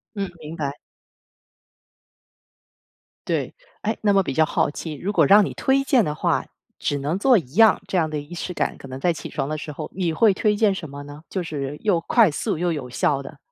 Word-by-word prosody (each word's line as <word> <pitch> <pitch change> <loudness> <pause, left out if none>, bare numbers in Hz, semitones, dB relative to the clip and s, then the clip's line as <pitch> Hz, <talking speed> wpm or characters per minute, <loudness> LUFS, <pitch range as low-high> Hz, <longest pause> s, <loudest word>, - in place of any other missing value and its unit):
嗯， 195 -2 -3
明 155 +2 -8
白。 145 -1 -3 2.5
对， - - -1 0.3
哎， 220 +2 0
那 205 -2 +3
么 195 - +5
比 140 - -3
较 155 +2 +3
好 - - +1
奇， 155 +1 -6
如 190 +8 -3
果 160 -7 +4
让 205 +4 +7
你 - - -4
推 270 +1 +1
荐 260 -4 +4
的 150 -5 -2
话 - - 0 0.3
只 145 - -1
能 150 +7 -2
做 255 +3 +5
一 145 - -3
样， 225 -1 +6
这 190 -2 0
样 160 - +2
的 155 -1 -3
仪 145 +4 -9
式 180 +1 -5
感， - - -2
可 135 - -11
能 130 +1 -6
在 175 +4 +2
起 - - -7
床 135 - -3
的 155 - -2
时 150 - -6
候， 145 - -6
你 175 -4 -1
会 215 +3 +5
推 210 +2 +1
荐 205 -2 +3
什 160 -5 -6
么 140 +1 -8
呢？ 145 +1 -11
就 185 - -3
是 145 -3 -4
又 195 -6 +2
快 215 +1 +4
速、 150 - -2
又 175 +1 0
有 140 -5 -5
效 140 +3 0
的。 140 - -11
165 Hz, 240 characters per minute, -23 LUFS, 145-200 Hz, 2.5 s, 让